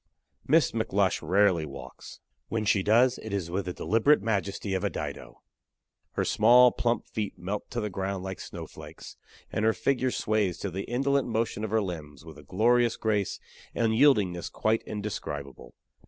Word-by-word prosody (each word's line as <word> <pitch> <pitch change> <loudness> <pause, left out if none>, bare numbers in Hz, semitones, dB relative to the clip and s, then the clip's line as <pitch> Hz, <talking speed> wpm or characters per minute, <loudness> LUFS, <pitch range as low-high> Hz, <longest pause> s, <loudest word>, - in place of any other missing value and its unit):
Miss - - +4
McLush - - 0
rarely 95 -3 +3
walks. 70 -2 -10 0.3
When 115 -1 -1
she 100 -1 +3
does, 120 +5 +3
it 110 - -8
is 95 -4 -3
with 95 +1 -2
the 90 - -4
deliberate 115 +11 +2
majesty 100 -2 -2
of 95 +1 -1
a 100 - +1
Dido. - - -7 0.7
Her - - -1
small, 120 +3 +6
plump 120 0 -1
feet 105 -2 -4
melt 100 +4 -5
to 120 - -3
the 105 -2 -3
ground 95 0 -3
like 95 -1 -5
snowflakes; - - -10 0.4
and 105 - -1
her 110 0 +4
figure 130 0 0
sways 105 -6 0
to 100 - -4
the 95 +3 -4
indolent 140 +3 +1
motion 110 -2 -1
of 110 - -2
her 110 0 +1
limbs 80 -4 -7
with 80 -1 -11
a - - -13
glorious 120 - +2
grace 105 -3 -1 0.4
and 115 -1 +1
yieldingness 105 -9 +3
quite 110 +1 +1
indescribable. 75 - -6
105 Hz, 170 wpm, -28 LUFS, 95-115 Hz, 0.7 s, small